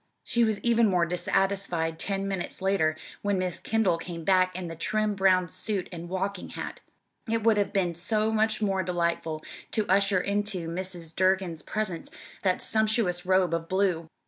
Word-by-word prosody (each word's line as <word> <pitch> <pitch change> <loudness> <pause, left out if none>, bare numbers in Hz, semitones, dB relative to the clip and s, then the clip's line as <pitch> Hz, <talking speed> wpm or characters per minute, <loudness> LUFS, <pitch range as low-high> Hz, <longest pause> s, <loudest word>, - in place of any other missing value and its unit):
She 235 - +2
was 220 -2 +1
even 235 -1 +4
more 180 -3 +3
dissatisfied 175 -2 0
ten 195 0 -2
minutes 190 -3 -3
later 175 -5 +1 0.2
when 205 -1 +1
Miss 180 -2 -2
Kendall 215 -7 +1
came 165 -1 -6
back 185 0 +3
in 180 -1 -4
the 165 - -6
trim 215 +5 0
brown 190 -2 +3
suit 200 +1 -3
and 170 -1 -7
walking 190 +1 -3
hat - - -6 0.5
it 225 -1 0
would 225 -1 +4
have 205 - +1
been 180 -4 +1
so 215 +6 0
much 220 0 +2
more 195 -2 +1
delightful 170 -3 -1 0.3
to 215 -2 0
usher 195 0 +3
into 200 -3 -1
Mrs. 175 -1 -6
Durgin's 185 -3 +1
presence 200 -6 -3 0.3
that 185 -2 +1
sumptuous 215 -5 +1
robe 185 -2 +3
of 165 0 -2
blue! 185 -4 +1
190 Hz, 170 wpm, -28 LUFS, 175-205 Hz, 0.5 s, even